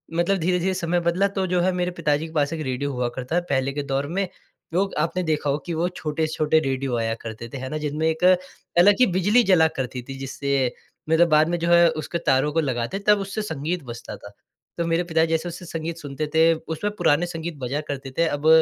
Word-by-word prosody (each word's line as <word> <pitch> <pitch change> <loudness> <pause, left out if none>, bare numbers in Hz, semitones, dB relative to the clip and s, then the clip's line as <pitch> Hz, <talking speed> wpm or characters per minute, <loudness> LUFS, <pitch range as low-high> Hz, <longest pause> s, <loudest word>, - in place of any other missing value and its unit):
मतलब 175 +3 +2
धीरे-धीरे 180 +2 +1
समय 175 -1 0
बदला 170 +3 +2
तो 190 -1 +1
जो 180 0 +1
है 185 +2 +2
मेरे 180 0 -1
पिता 150 -3 +2
जी 155 - -5
के 160 - -13
पास 145 -1 +1
एक 160 - -4
रेडियो 130 +2 -2
हुआ 125 -1 -1
करता 130 +5 -3
है, 175 - +3
पहले 135 -1 +1
के 145 0 -3
दौर 140 0 -1
में 190 +5 -1 0.5
लोग 195 +3 +1
आपने 170 +4 0
देखा 155 -3 0
हो 140 - +1
कि 175 - -3
वो 165 +2 0
छोटे-छोटे 155 -2 0
रेडियो 135 -3 -1
आया 115 -1 0
करते 115 +1 -7
थे, 135 - -7
है 130 0 -5
ना। 155 - -3
जिनमें 150 +1 -1
एक 160 +2 -1 0.5
अलग 200 +4 +7
ही 255 - +7
बिजली 205 +7 +4
जला 180 -6 +5
करती 130 -1 -3
थी 135 - -6
जिससे 135 -1 -1 0.4
मेरा 160 +2 +5
बाद 155 -1 +4
में 175 - 0
जो 170 +1 -1
है 170 0 +7
उसके 160 +1 -3
तारों 135 +3 +3
को 165 - +2
लगाते 130 +5 -2
तब 210 -1 +6
उससे 195 +2 -3
संगीत 170 -3 -3
बजता 120 -2 -8
था। 100 - -11 0.5
तो 170 - 0
मेरे 165 +1 +1
पिता 165 -2 +2
जैसे 165 +1 -1
उससे 175 +1 -8
संगीत 165 0 -4
सुनते 150 -1 -4
थे, 165 +1 +6
उसमें 160 +5 -4
पुराने 165 -2 +3
संगीत 170 -1 -5
बजा 135 +3 -2
करते 135 -1 -6
थे। 165 - +3
अब, 145 0 -1
160 Hz, 230 wpm, -23 LUFS, 140-175 Hz, 0.5 s, अलग